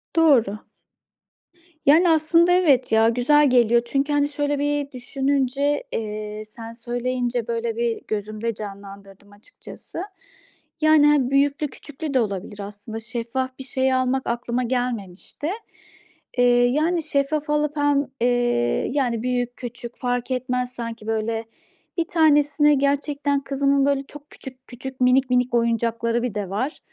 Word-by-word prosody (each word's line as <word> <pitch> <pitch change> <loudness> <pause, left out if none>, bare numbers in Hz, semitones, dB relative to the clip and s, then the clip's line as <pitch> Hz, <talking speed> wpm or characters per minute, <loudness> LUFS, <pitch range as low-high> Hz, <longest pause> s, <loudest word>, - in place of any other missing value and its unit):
Doğru. 255 -11 +4 1.3
Yani, 325 +5 +6
aslında 330 +2 +4
evet, 300 -9 +3
ya, 225 0 +5
güzel 275 +5 +4
geliyor 235 -1 +4
çünkü, 275 +4 0
hani, 290 0 +2
şöyle 290 0 -1
bir 290 -1 -1
düşününce, 275 +2 -1
eee, 215 -1 -4
sen 225 +1 -10
söyleyince, 245 0 -2
böyle, 230 -1 -2
bir 235 -1 -1
gözümde 215 +2 -3
canlandırdım 200 -1 -10
açıkçası. 205 - -12 0.8
Yani, 310 -1 +5
hani, 280 -4 +3
büyüklü, 280 +2 +2
küçüklü 295 +2 -7
de 260 - +3
olabilir 205 -2 -3
aslında. 205 +2 -7
Şeffaf 240 +3 -4
bir - - -5
şey 260 0 0
almak 255 +1 0
aklıma 240 +1 -1
gelmemişti. 245 - -4 0.9
Eee, 245 - +4 0.2
yani 315 +7 +1
şeffaf 295 +1 -1
alıp 300 0 0
hem, 290 -1 +2
eee, 240 - +1
yani, 245 -5 0
büyük, 245 -1 -2
küçük 240 -1 -8
fark 245 0 -2
etmez 250 0 -1
sanki, 230 -2 -7
böyle, 225 0 -1 0.5
1 335 - +1
tanesine 295 -2 +4
gerçekten 285 +1 0
kızımın, 275 0 +1
böyle, 280 -1 +1
çok 295 +1 -14
küçük 260 -1 -12
küçük, 260 +1 -9
minik 255 +1 +4
minik 250 0 +1
oyuncakları 230 0 0
bir 240 -5 -3
de 200 -3 -3
var. 255 +10 -3
250 Hz, 135 wpm, -23 LUFS, 230-285 Hz, 1.3 s, Yani